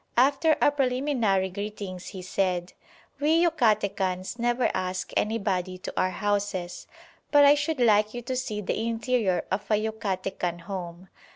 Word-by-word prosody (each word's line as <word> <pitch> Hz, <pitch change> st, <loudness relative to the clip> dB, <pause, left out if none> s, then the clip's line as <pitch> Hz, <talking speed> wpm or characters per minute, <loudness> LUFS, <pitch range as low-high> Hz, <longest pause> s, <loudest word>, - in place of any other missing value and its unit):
After 285 Hz, +5 st, +4 dB
our -, -, +5 dB
preliminary 250 Hz, -8 st, +1 dB
greetings 200 Hz, -2 st, -6 dB
he 185 Hz, -2 st, -7 dB
said, 185 Hz, -1 st, -1 dB, 0.5 s
"We 310 Hz, +3 st, +3 dB
Yucatecans 205 Hz, -, +1 dB
never 240 Hz, +1 st, +1 dB
ask 185 Hz, 0 st, -3 dB
anybody 195 Hz, -4 st, -1 dB
to 185 Hz, -, -7 dB
our 185 Hz, -, +2 dB
houses, 200 Hz, -2 st, -2 dB, 0.4 s
but 290 Hz, -1 st, +6 dB
I 285 Hz, -, +8 dB
should 295 Hz, 0 st, -1 dB
like 215 Hz, -3 st, +4 dB
you 240 Hz, -, -5 dB
to 255 Hz, +2 st, -3 dB
see 220 Hz, -5 st, -3 dB
the 205 Hz, -, -2 dB
interior 225 Hz, -4 st, 0 dB
of 200 Hz, +2 st, -2 dB
a 215 Hz, -, +4 dB
Yucatecan 195 Hz, -5 st, -2 dB
home. 180 Hz, -1 st, -7 dB
210 Hz, 145 wpm, -26 LUFS, 185-245 Hz, 0.5 s, I